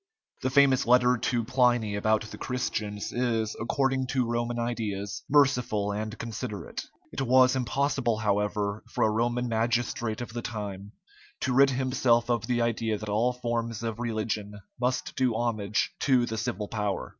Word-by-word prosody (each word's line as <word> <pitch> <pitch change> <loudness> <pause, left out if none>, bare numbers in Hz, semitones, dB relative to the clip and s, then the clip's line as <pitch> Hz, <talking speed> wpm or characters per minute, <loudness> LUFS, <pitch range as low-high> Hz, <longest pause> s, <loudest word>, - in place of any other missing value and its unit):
The 130 - 0
famous 135 -2 +4
letter 125 0 +5
to 120 0 0
Pliny 120 -3 +2
about 110 +1 +2
the - - -8
Christians 105 -5 -3
is, 115 -3 0
according 130 +2 0
to 130 -1 +1
Roman 120 +1 -1
ideas, 110 -5 -3
merciful 125 -8 +3
and 110 +2 -4
considerate. 115 -2 -5 0.3
It - - -3
was 130 0 +5
impossible, 130 -2 0
however, 105 0 -1
for - - +2
a 110 - +3
Roman 120 +2 0
magistrate 115 0 0
of 120 -2 -6
the 120 - -3
time 105 -2 -6 0.5
to 130 - 0
rid 135 +2 +6
himself 125 -2 +2
of 115 -2 0
the 120 -1 +1
idea 115 -2 0
that 105 0 -7
all 115 +4 +2
forms 115 -2 -3
of 115 -1 -3
religion 110 -3 -3 0.2
must 125 +1 -1
do 125 -3 +1
homage 110 -3 0
to 130 -3 +3
the 110 - -4
civil 105 -2 -3
power. 105 -3 -2
115 Hz, 155 wpm, -28 LUFS, 110-125 Hz, 0.5 s, rid